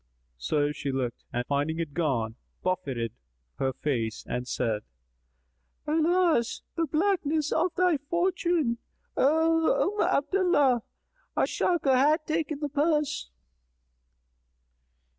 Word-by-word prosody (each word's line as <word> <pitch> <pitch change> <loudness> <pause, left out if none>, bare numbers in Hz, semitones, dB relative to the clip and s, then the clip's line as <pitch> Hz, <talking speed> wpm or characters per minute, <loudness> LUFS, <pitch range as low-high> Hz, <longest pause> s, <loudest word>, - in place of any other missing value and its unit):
So 145 - +1
she 145 -1 -3
looked 130 -3 -3
and 120 0 -2
finding 145 +4 0
it 165 -4 -3
gone, 130 -9 0 0.3
buffeted 135 -11 -2 0.5
her 135 - +1
face 120 -5 -2
and 125 0 -3
said, 115 -5 -1 1.0
"Alas 320 -5 +2
the 335 -1 0
blackness 315 -2 +1
of 360 - +2
thy 360 -3 +3
fortune, 340 -4 0 0.4
O 325 +6 +3
Umm - - +4
Abdallah! 290 -7 +3 0.6
A - - +4
sharker 315 -7 +1
hath 300 +4 +3
taken 310 -2 -2
the 295 - -1
purse." 300 - 0
285 Hz, 105 wpm, -28 LUFS, -, 1.0 s, Umm